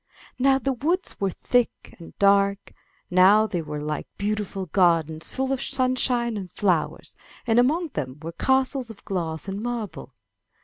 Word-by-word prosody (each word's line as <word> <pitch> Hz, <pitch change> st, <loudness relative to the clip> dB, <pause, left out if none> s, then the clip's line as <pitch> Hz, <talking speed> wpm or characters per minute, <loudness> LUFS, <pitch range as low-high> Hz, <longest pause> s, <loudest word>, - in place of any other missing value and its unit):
Now 270 Hz, +1 st, +4 dB
the 270 Hz, 0 st, -1 dB
woods 335 Hz, +9 st, -1 dB
were 195 Hz, -, +1 dB
thick 245 Hz, +6 st, -1 dB
and 170 Hz, -, -13 dB
dark, 200 Hz, 0 st, +3 dB, 0.4 s
now 190 Hz, +4 st, +6 dB
they 180 Hz, -5 st, -2 dB
were 150 Hz, -1 st, -5 dB
like 150 Hz, +1 st, -4 dB
beautiful 205 Hz, -2 st, -2 dB
gardens 165 Hz, -3 st, +2 dB
full 265 Hz, 0 st, -1 dB
of 265 Hz, -, -3 dB
sunshine 255 Hz, -3 st, 0 dB
and 185 Hz, -4 st, -7 dB
flowers, 180 Hz, -6 st, -1 dB, 0.3 s
and 230 Hz, -1 st, +3 dB
among 315 Hz, +7 st, +2 dB
them 135 Hz, -, -5 dB
were 165 Hz, +2 st, -6 dB
castles 265 Hz, -, +1 dB
of 220 Hz, -3 st, -12 dB
glass 165 Hz, -3 st, -3 dB
and 195 Hz, +1 st, -4 dB
marble. 225 Hz, -, -5 dB
200 Hz, 150 wpm, -24 LUFS, 175-255 Hz, 0.4 s, now